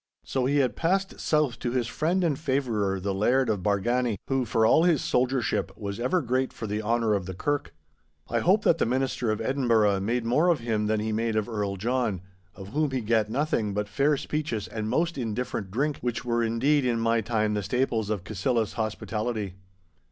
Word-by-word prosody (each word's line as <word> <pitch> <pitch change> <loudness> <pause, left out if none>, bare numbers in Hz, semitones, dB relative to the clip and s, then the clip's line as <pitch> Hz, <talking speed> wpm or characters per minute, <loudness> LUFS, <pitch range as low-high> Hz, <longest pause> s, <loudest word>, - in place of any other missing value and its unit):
So 130 -1 -1
he 145 +2 +2
had 130 -3 +2
passed 190 +3 0
south 150 -5 +1
to 120 - -2
his 125 -1 0
friend 170 +9 0
and 155 -5 0
favourer 115 -10 0
the 100 +1 -2
Laird 120 +6 +2
of 105 -3 0
Bargany, 110 +4 +1
who 135 -2 0
for 110 0 +2
all 160 - +5
his 170 -6 +3
soldiership 125 0 0
was 100 0 -5
ever 145 +8 +1
great 130 +1 0
for 110 - -7
the 105 0 -2
honour 115 0 +1
of 100 -3 -1
the 95 - -5
Kirk. 145 +8 -2 0.6
I 115 - 0
hope 195 - +3
that 165 - +3
the - - +2
Minister 130 -1 0
of 110 - 0
Edinburgh 115 -7 +2
made 115 +4 -1
more 140 +9 +3
of 170 -5 +3
him 110 -2 -1
than 110 0 +1
he 110 +1 -2
made 115 +1 -1
of 110 -1 0
Earl 105 -4 -2
John, 110 -2 -1 0.3
of 95 0 -9
whom 150 +5 0
he 130 -1 -2
gat 110 -1 +1
nothing 115 -6 0
but 105 0 -1
fair 140 +7 +2
speeches 150 -7 -3
and 110 -1 -4
most 165 +3 0
indifferent 115 -3 -3
drink, 140 +9 -1
which 120 -1 -3
were 120 -1 +1
indeed 125 +6 +2
in 120 -2 +1
my 115 0 +2
time 110 -1 0
the 105 - 0
staples 110 0 0
of 105 -5 -2
Cassillis 110 +4 -1
hospitality. 110 -2 -3
115 Hz, 205 wpm, -27 LUFS, 105-135 Hz, 0.6 s, all